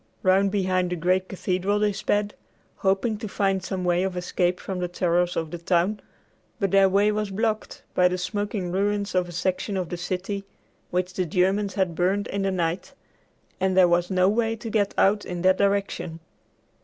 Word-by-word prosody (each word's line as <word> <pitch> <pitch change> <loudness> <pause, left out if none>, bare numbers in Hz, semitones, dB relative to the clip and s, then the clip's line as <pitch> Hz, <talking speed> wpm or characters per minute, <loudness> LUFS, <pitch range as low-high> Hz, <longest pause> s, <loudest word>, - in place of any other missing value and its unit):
Round 190 +1 +4
behind 185 -2 0
the 180 - -1
great 185 +2 +1
cathedral 190 +1 -1
they 210 0 +1
sped, 205 +1 0 0.4
hoping 195 +3 0
to 220 - -5
find 195 -2 0
some 185 -1 -3
way 175 0 +2
of 190 -1 -2
escape 180 0 0
from 190 -2 -5
the 180 - -1
terrors 175 0 0
of 160 -2 -2
the 175 - -5
town, 180 +4 +1 0.6
but 195 -4 0
their 195 -1 +5
way 200 +2 +3
was 210 -1 -2
blocked 215 +2 -2
by 180 - +4
the 180 0 -1
smoking 205 -1 -3
ruins 200 +2 0
of 180 -1 +1
a - - -7
section 185 +3 -1
of 180 -3 -2
the 175 - -4
city 190 +3 -3 0.5
which 180 +1 -1
the 185 -1 -1
Germans 190 +4 +1
had 190 -4 +1
burned 190 +4 +1
in 200 - -2
the 195 - +1
night, 175 -1 -2 0.7
and 190 0 +1
there 185 -1 +7
was 175 0 +2
no 185 -1 +3
way 225 +2 +1
to 225 0 -7
get 205 -2 +1
out 205 +1 +3
in 175 -1 -5
that 185 0 +4
direction. 200 -4 0
190 Hz, 190 wpm, -25 LUFS, 180-200 Hz, 0.7 s, there